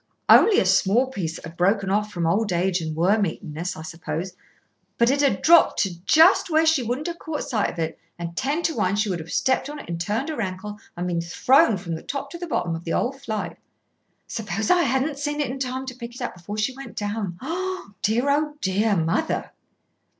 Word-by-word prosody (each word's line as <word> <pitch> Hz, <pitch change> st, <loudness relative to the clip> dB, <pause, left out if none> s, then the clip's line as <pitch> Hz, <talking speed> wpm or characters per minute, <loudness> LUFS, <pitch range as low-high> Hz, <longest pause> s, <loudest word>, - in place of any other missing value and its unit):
"Only 440 Hz, -, +7 dB
a -, -, +2 dB
small 200 Hz, +7 st, +3 dB
piece 165 Hz, -9 st, -3 dB
that -, -, -9 dB
had 165 Hz, +1 st, -10 dB
broken 195 Hz, +2 st, +2 dB
off 210 Hz, +1 st, 0 dB
from 175 Hz, -4 st, -2 dB
old 200 Hz, +5 st, +1 dB
age 180 Hz, +1 st, +1 dB
and 160 Hz, -1 st, -4 dB
worm 195 Hz, +5 st, +3 dB
eatenness, 165 Hz, +2 st, -5 dB
I 160 Hz, -, -7 dB
suppose, 170 Hz, +2 st, -5 dB, 0.6 s
but 235 Hz, +1 st, +4 dB
it 280 Hz, +1 st, +1 dB
had 280 Hz, -2 st, +1 dB
dropped 335 Hz, -10 st, +5 dB, 0.2 s
just 330 Hz, +4 st, +6 dB
where 320 Hz, 0 st, +3 dB
she 320 Hz, -4 st, +4 dB
wouldn't 245 Hz, +5 st, -3 dB
have 340 Hz, -1 st, -4 dB
caught 320 Hz, -2 st, -4 dB
sight 220 Hz, -7 st, 0 dB
of -, -, -9 dB
it, 160 Hz, -1 st, -3 dB, 0.2 s
and 170 Hz, 0 st, -6 dB
ten 290 Hz, -, -1 dB
to 325 Hz, -, 0 dB
one 200 Hz, -2 st, +1 dB
would 185 Hz, -4 st, -2 dB
have 160 Hz, +1 st, -8 dB
stepped 260 Hz, +1 st, +1 dB
on 295 Hz, -, -6 dB
it -, -, -10 dB
and 170 Hz, -1 st, -4 dB
turned 220 Hz, -, -1 dB
her 305 Hz, -7 st, -3 dB
ankle 205 Hz, +2 st, -5 dB, 0.2 s
and 175 Hz, -, -2 dB
been 175 Hz, -2 st, -1 dB
thrown 215 Hz, +6 st, +3 dB
from 175 Hz, -2 st, -5 dB
the 160 Hz, -, -5 dB
top 280 Hz, 0 st, -5 dB
to 340 Hz, -, -7 dB
the 350 Hz, -, -5 dB
bottom 175 Hz, -, -1 dB
of 165 Hz, -, -7 dB
the 165 Hz, -, -3 dB
whole 245 Hz, -, +1 dB
flight. 230 Hz, -6 st, -5 dB, 0.7 s
Suppose 215 Hz, -1 st, -2 dB
I 360 Hz, -1 st, +5 dB
hadn't 275 Hz, +1 st, 0 dB
seen 295 Hz, +1 st, -2 dB
it 290 Hz, -4 st, 0 dB
in 270 Hz, -, -6 dB
time 260 Hz, 0 st, -3 dB
to 255 Hz, -1 st, -6 dB
pick 240 Hz, -1 st, -8 dB
it 255 Hz, -, -9 dB
up -, -, -3 dB
before 185 Hz, +4 st, -7 dB
she 235 Hz, +5 st, -1 dB
went 270 Hz, -4 st, -10 dB
down. 205 Hz, -4 st, -3 dB
Oh, 365 Hz, -, -4 dB
dear! 225 Hz, +5 st, +1 dB
Oh, 295 Hz, +1 st, +1 dB
dear! 205 Hz, 0 st, +1 dB
Mother!" 165 Hz, -, -1 dB
215 Hz, 225 wpm, -24 LUFS, 180-275 Hz, 0.7 s, Only